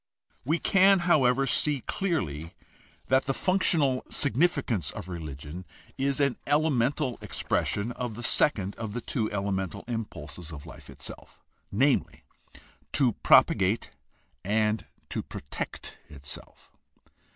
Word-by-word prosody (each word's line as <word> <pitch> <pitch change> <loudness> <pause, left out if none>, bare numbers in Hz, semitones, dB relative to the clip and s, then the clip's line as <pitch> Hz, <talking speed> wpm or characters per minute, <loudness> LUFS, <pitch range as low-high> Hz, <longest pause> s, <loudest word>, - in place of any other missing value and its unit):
We 155 +6 +1
can, 195 +1 +5
however, 135 -6 +4
see 145 0 +2
clearly 80 - -2 0.5
that 130 +1 +4
the 135 -1 0
functional 160 -8 +2
significance 140 - +1
of 85 - -6
religion 80 -1 -7 0.3
is 140 +1 0
an 140 -4 +2
elemental 145 -3 +1
expression 105 +2 -1
of 125 -2 -4
the 120 - -7
second 105 -6 +2
of 110 -3 -5
the 120 - -3
two 110 -3 -2
elemental 95 -3 -2
impulses 90 -8 -5
of 75 -1 -9
life 80 - -12
itself, - - -8 0.3
namely, 135 +7 +1 0.7
to 130 -5 +3
propagate 100 +3 +4 0.5
and 110 +2 +1 0.2
to - - -2
protect 70 - -6
itself. 70 -2 -9
120 Hz, 115 wpm, -28 LUFS, 95-140 Hz, 0.7 s, can